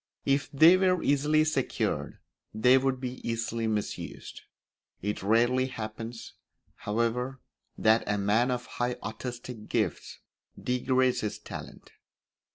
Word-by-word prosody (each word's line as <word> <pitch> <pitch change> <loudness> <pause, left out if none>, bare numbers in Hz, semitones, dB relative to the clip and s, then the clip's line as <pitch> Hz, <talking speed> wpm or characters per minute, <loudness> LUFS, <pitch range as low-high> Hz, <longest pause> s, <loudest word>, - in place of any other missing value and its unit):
If 140 +1 +1
they 160 +6 +7
were 185 -2 +2
easily 150 +2 +3
secured 155 -4 -1 0.4
they 125 +4 +5
would 130 -1 0
be 125 0 -5
easily 115 0 -2
misused; 105 -2 -4 0.6
it 105 +1 -2
rarely 120 +5 +3
happens, 115 -1 -7 0.4
however, 115 +5 -2 0.4
that 110 +1 +4
a 105 - +1
man 105 +5 +2
of 125 -1 -2
high 120 0 -2
artistic 120 0 -7
gifts - - -1 0.4
degrades 130 0 +1
his 105 - -3
talent. - - -10
125 Hz, 115 wpm, -28 LUFS, 110-130 Hz, 0.6 s, they